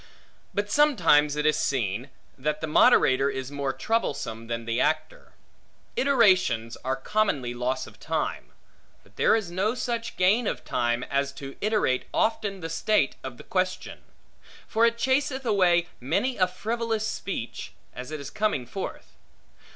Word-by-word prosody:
But 205 +1 -2
sometimes 170 - +4
it 150 0 -1
is 155 - +3
seen, 120 -1 -1 0.3
that 150 +3 -2
the 160 - -2
moderator 135 -3 +5
is 135 0 -5
more 140 -1 -2
troublesome, 120 - -2
than 115 0 -4
the 115 +2 0
actor. 155 0 -2 0.6
Iterations 185 - +3
are 130 +1 0
commonly 135 - 0
loss 125 +2 -2
of - - -15
time. - - -2 0.6
But - - -24
there - - +4
is 205 -6 -2
no 200 +6 0
such 235 -2 -3
gain 205 +6 +3
of - - -3
time, 120 +1 0
as 140 0 -1
to 135 -1 -8
iterate 210 -12 +1
often 205 -3 0
the 165 - -4
state 165 -3 +1
of 130 -2 -7
the - - -11
question; 185 -1 -2 0.7
for 230 +1 +3
it 230 0 -1
chaseth 265 +1 0
away 180 -6 +3
many 170 - 0
a 185 -2 +3
frivolous 220 +3 -2
speech, 195 - -5 0.2
as 125 +2 -7
it 155 0 -5
is 140 - -7
coming 215 - 0
forth. 185 +11 -7
170 Hz, 150 wpm, -26 LUFS, 130-215 Hz, 0.7 s, moderator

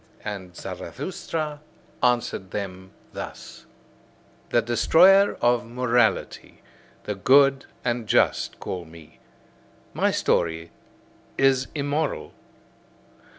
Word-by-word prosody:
And 95 -4 -6
Zarathustra 150 - -5 0.4
answered 120 -6 0
them 95 -2 -6 0.2
thus: - - -9 0.8
The 120 - +2
destroyer 185 - +5
of 120 0 +3
morality, 120 -1 0 0.4
the 105 - -3
good 135 +6 +4 0.2
and 120 -2 -1
just - - +1
call 90 -2 -5
me: 80 -1 -16 0.7
my - - +2
story 80 0 0 0.7
is 135 -1 +3
immoral. 145 +1 -2
120 Hz, 85 wpm, -24 LUFS, 95-140 Hz, 0.8 s, destroyer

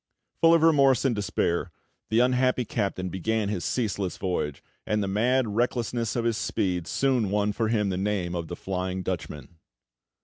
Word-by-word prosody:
Full 165 0 +7
of 165 - +2
remorse 140 -6 +4
and 125 -4 +2
despair, 95 -3 -1 0.4
the 110 +2 +3
unhappy 125 0 +2
captain 100 -4 -2
began 105 +4 -1
his 95 -5 -2
ceaseless 105 -6 -2
voyage, 90 -7 -2 0.2
and 105 -1 0
the - - -2
mad 115 +5 +1
recklessness 120 +1 -1
of 120 -1 -1
his 115 -2 +1
speed 90 -5 -1
soon 130 -7 +1
won 105 +1 +1
for 110 +1 -1
him 105 -3 +1
the 90 - -2
name 95 -3 -1
of 85 -2 -3
the 85 - -5
"Flying 95 0 -3
Dutchman." 80 -3 -6
105 Hz, 170 wpm, -26 LUFS, 95-120 Hz, 0.4 s, Full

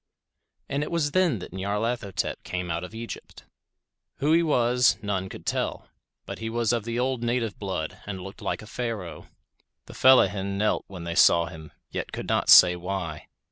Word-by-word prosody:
And 140 +1 -2
it 150 - -3
was 160 -4 0
then 180 -7 +2
that 90 - -9
Nyarlathotep 100 +2 -2
came 90 -1 -4
out 85 +2 -2
of 90 - -9
Egypt. 115 +1 -8 0.7
Who 145 +3 0
he 170 - +5
was, 125 -5 +3
none 95 -2 -2
could - - -10
tell, - - -2 0.4
but - - -7
he 115 - -4
was 115 0 0
of 115 -3 -1
the 115 0 -3
old 130 0 0
native 120 -2 -1
blood 95 -6 -4
and 95 -2 -5
looked 95 +2 -10
like - - -3
a - - -10
Pharaoh. 110 -6 -5 0.6
The - - -12
fellahin 100 -6 +4
knelt 105 +1 0
when 90 -3 -9
they 85 0 -3
saw 85 -1 +5
him, 80 -2 -10 0.2
yet - - -4
could - - -6
not - - 0
say 90 -1 +9
why. 90 -3 -5
105 Hz, 180 wpm, -26 LUFS, 95-120 Hz, 0.7 s, say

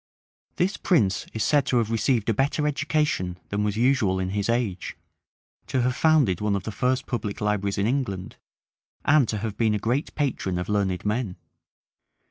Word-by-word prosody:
This 190 +3 0
prince 100 - +1
is 110 - -2
said 145 +5 +2
to 125 - +2
have 115 -2 +1
received 115 0 +1
a 115 - +3
better 140 +6 0
education 150 - 0
than 100 +1 -1
was 105 0 -1
usual 120 -6 +2
in 95 0 -2
his 100 +2 -2
age, 115 -7 -1 0.7
to 130 -2 0
have 125 +1 +1
founded 145 - +3
one 105 -1 +1
of 100 - -3
the 110 - -4
first 125 +4 0
public 110 -5 -3
libraries 105 -1 0
in 100 - +1
England, 110 -7 -2 0.7
and 145 -5 +4
to 110 - -1
have 105 -1 -4
been 110 -2 +2
a - - +1
great 120 +8 -1
patron 125 -11 -1
of 90 - -4
learned 100 -3 0
men. 105 -3 -1
110 Hz, 180 wpm, -25 LUFS, 100-130 Hz, 0.7 s, and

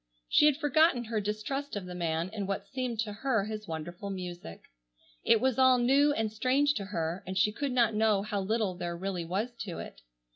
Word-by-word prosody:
She 300 - +5
had 290 -2 +3
forgotten 300 -3 +3
her 225 -2 -2
distrust 215 +8 -3
of 200 -2 -4
the 180 - -7
man 170 0 -1
in 205 -3 -3
what 195 - -3
seemed 255 -4 -4
to 210 -2 -4
her 225 -1 0
his 215 -1 -6
wonderful 175 +5 -6
music. 175 - -7 0.6
It 230 - +5
was 260 0 +1
all 260 -1 +6
new 275 +4 +4
and 220 -6 -1
strange 260 +6 +2
to 200 -6 -4
her, 170 -2 -3
and 190 0 -3
she 210 +3 +3
could 275 +5 -3
not 235 -3 +3
know 210 -2 +2
how 205 -1 -2
little 215 -1 0
there 175 -1 -4
really 185 -2 -3
was 200 +8 -2
to 190 -4 -5
it. - - -9
210 Hz, 210 wpm, -30 LUFS, 185-255 Hz, 0.6 s, all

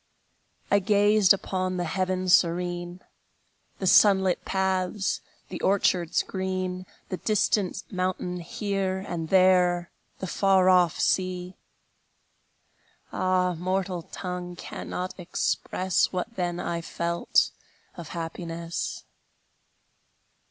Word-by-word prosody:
I 200 - +5
gazed 205 0 +4
upon 185 -1 0
the 175 - -1
heaven 185 +2 -1
serene, 175 0 +1 0.8
The 190 - -4
sun 195 +1 +6
lit 185 -2 0
paths, 190 +1 0 0.3
the - - -6
orchards 185 -3 +2
green, 185 -1 -3 0.2
The 185 - -3
distant 210 -2 0
mountain 185 -1 -2
here, 195 +1 -2
And 165 -2 -4
there, 180 -2 +4 0.3
the - - -5
far 190 0 +3
off 180 -3 +4
sea. 185 -1 0 1.6
Ah, 185 -1 +1
mortal 185 +1 -2
tongue 180 +1 -6
cannot 180 +1 -5
express 180 +1 0
What 185 +5 -4
then 175 -2 -2
I 170 -1 -2
felt 170 +1 0 0.4
of 170 -3 -8
happiness! 165 0 -5
185 Hz, 100 wpm, -26 LUFS, 175-190 Hz, 1.6 s, sun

